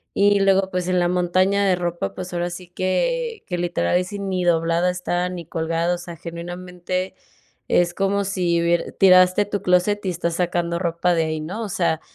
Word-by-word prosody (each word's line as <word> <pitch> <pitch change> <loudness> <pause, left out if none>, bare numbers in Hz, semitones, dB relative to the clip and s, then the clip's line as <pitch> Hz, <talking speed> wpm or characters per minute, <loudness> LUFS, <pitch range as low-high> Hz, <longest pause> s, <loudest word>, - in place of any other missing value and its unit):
Y 205 0 +4
luego, 195 -1 +3
pues, 180 -1 -2
en 180 -1 +2
la 175 - +2
montaña 185 +3 +2
de 185 - +3
ropa, 175 - -3
pues, 180 0 -7
ahora 175 0 -1
sí 175 0 -8
que 460 - -1
que 180 - -2
literal 170 - 0
ahí 180 - +3
sí, 200 +2 -7
ni 190 -2 -2
doblada 170 +1 +2
está, 180 0 -2
ni 175 -2 -7
colgada, 165 +2 -1
o - - -6
sea, 175 -1 -8
genuinamente, 180 +2 -5 0.5
es 175 -1 +2
como 200 +1 +1
si 175 -3 0
hubiere 170 0 +1
tiraste 185 +1 +5
tu 205 0 -3
clóset 185 +3 +2
y - - 0
estás 170 -1 -2
sacando 175 -1 -1
ropa 175 0 0
de 165 - +2
ahí, 155 0 -2
¿no? 190 +9 -5
O 215 - -5
sea 170 -4 0
180 Hz, 200 wpm, -22 LUFS, 170-190 Hz, 0.5 s, tiraste